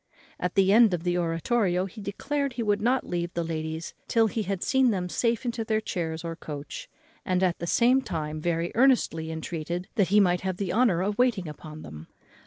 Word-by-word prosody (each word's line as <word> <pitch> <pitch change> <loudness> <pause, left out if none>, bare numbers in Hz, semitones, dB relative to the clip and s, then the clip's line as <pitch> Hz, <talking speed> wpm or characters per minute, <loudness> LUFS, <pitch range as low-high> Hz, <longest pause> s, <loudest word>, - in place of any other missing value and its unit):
At 180 0 -2
the 195 0 +4
end 220 -4 +6
of 165 - -7
the 175 -1 0
oratorio 180 +3 +1
he 210 +3 -9
declared 275 +7 -2
he 240 -1 -2
would 205 -1 +1
not 250 +4 +1
leave 175 -1 -2
the 170 - 0
ladies 160 0 -4
till 230 -1 +3
he 220 +1 -1
had 195 -2 -2
seen 265 -1 +3
them 185 -5 -1
safe 230 +6 0
into 235 -1 -2
their 220 0 +1
chairs 165 -6 -3
or 165 -1 -4
coach; 160 - -7 0.3
and 185 -1 0
at 180 -2 +1
the 170 - -4
same 250 +7 +4
time 155 -7 -4
very 170 +1 -1
earnestly 230 -11 +2
entreated 165 +2 -4
that 200 -4 +4
he 205 +4 +4
might 180 -3 +3
have 185 -1 -2
the 190 -3 -2
honour 215 -8 +3
of 205 +3 -2
waiting 230 -8 +2
on 155 0 -9
them. 75 +1 -10
185 Hz, 205 wpm, -27 LUFS, 170-225 Hz, 0.3 s, end